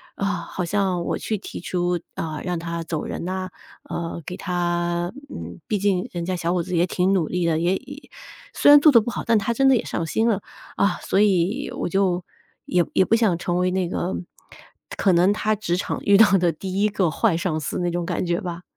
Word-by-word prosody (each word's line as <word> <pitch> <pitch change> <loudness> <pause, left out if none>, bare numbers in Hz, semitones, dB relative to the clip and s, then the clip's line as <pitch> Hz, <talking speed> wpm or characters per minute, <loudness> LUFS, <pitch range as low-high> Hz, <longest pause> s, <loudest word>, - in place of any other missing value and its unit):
啊， 200 - -2
好 180 -1 -3
像 190 -2 0
我 - - -2
去 215 - -2
提 - - -8
出， 175 -1 -1 0.2
啊， 155 -2 -4
让 180 -1 -2
他 170 0 -4
走 160 -1 -3
人 - - -5
呐， 185 0 -3 0.3
呃， 170 0 -5
给 180 - -5
他 175 -1 -1 0.2
嗯， 85 +1 -8
毕 210 - 0
竟 195 -2 0
人 175 -1 -3
家 185 +1 -1
小 170 +1 -1
伙 180 - +1
子 180 - -6
也 170 - +4
挺 180 +2 +1
努 175 -5 +1
力 180 -1 -1
的， 165 -2 +2
也 175 +3 +2
已 285 +6 -9 0.4
虽 - - +4
然 290 - +10
做 300 +1 +6
得 235 - +8
不 220 - -4
好， - - -4
但 230 -1 +4
他 220 +3 0
真 270 +3 +3
的 265 - +6
也 - - -2
上 165 - -2
心 220 +8 +1
了， 205 -3 0 0.4
啊， 200 -3 +1
所 195 - 0
以 205 +6 +1
我 - - -2
就 185 -1 +1 0.4
也 175 -1 +2
也 - - +4
不 - - 0
想 215 -7 +2
成 175 0 -2
为 180 0 +1
那 185 -1 0
个， 180 +1 -2 0.8
可 190 - +3
能 180 +3 +4
他 215 +1 0
职 195 -4 -1
场 - - -3
遇 200 0 +5
到 225 - +7
的 175 -1 +2
第 190 +5 -4
一 210 - +3
个 195 -4 +1
坏 195 -5 +1
上 170 -3 -1
司 - - -3
那 175 -1 0
种 175 0 -2
感 175 0 -2
觉 175 0 -1
吧。 175 -1 -6
180 Hz, 245 characters per minute, -23 LUFS, 175-200 Hz, 0.8 s, 然